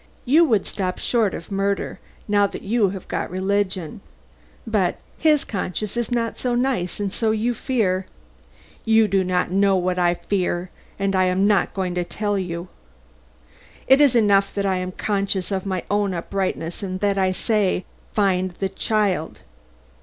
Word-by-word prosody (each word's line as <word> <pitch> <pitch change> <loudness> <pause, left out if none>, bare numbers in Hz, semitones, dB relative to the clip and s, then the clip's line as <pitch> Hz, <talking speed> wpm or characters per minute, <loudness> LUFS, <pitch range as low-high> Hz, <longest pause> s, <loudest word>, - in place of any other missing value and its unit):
You 300 +7 +5
would 220 -9 +2
stop 185 -2 -3
short 225 -6 +1
of 170 - -9
murder, 195 0 -1 0.3
now 205 -1 +3
that - - -8
you 210 -1 +2
have 190 -1 -7
got - - -3
religion. 190 0 -1 0.6
But 210 -6 +1 0.2
his 305 -2 +4
conscience 200 +1 -3
is 240 -1 -1
not 235 -2 -1
so 245 -1 0
nice 240 -9 -1
and 200 -1 -2
so 225 - 0
you 220 +3 +1
fear 200 -7 0 0.4
" - - -28
"You 220 -1 +6
do 195 -1 +2
not 180 -1 0
know 195 +1 +3
what 180 0 0
I 175 0 +3
fear 180 -2 -2 0.3
and 195 -1 0
I 185 0 +4
am 185 +2 +2
not 205 -3 +2
going 185 -2 -1
to 180 0 0
tell 205 +2 -2
you. 170 -1 -4 1.2
It 265 +2 +6
is 280 -4 +5
enough 200 -3 +4
that 200 -1 0
I 190 -1 +1
am 185 0 -3
conscious 195 -1 -1
of 195 0 -2
my 185 -2 -2
own 205 -2 +1
uprightness 175 -1 -3
and 185 -2 -4
that 200 -1 +1
I 190 -1 +2
say, 195 -2 0 0.3
Find 185 -3 +1
the 195 +1 -2
child! 195 -4 -1
195 Hz, 170 wpm, -22 LUFS, 185-210 Hz, 1.2 s, You